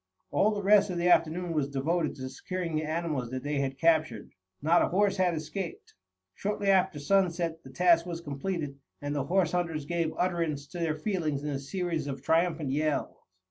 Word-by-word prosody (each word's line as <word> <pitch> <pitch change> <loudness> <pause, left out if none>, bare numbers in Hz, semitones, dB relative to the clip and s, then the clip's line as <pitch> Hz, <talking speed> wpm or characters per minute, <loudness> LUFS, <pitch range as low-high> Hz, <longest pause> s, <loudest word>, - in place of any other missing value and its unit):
All 210 - +3
the 205 -2 -2
rest 205 +1 +5
of 180 - -3
the 175 +1 +2
afternoon 175 +1 +2
was 145 -3 0
devoted 155 +4 0
to 130 -2 -6
securing 175 +4 -4
the 155 - +1
animals 155 -5 -2
that 130 0 -5
they 145 0 -1
had 135 -1 -2
captured. 155 -8 +1 0.3
Not 165 +4 +4
a - - +3
horse 200 +1 +2
had 180 -2 +2
escaped. 160 +3 -6 0.4
Shortly 205 - -2
after 190 -3 +3
sunset 170 0 +1
the 130 - -13
task 170 +4 +3
was 170 -1 -4
completed 145 -1 -4 0.2
and 145 0 -3
the 140 -2 -1
horse 175 0 +2
hunters 165 -4 -1
gave 170 0 -1
utterance 165 -5 -1
to 175 - -7
their 165 -2 0
feelings 155 -5 -2
in 150 - -2
a 135 - -2
series 160 +1 -3
of 135 -1 -5
triumphant 165 -3 +1
yells. 150 +1 0
165 Hz, 190 wpm, -29 LUFS, 145-180 Hz, 0.4 s, rest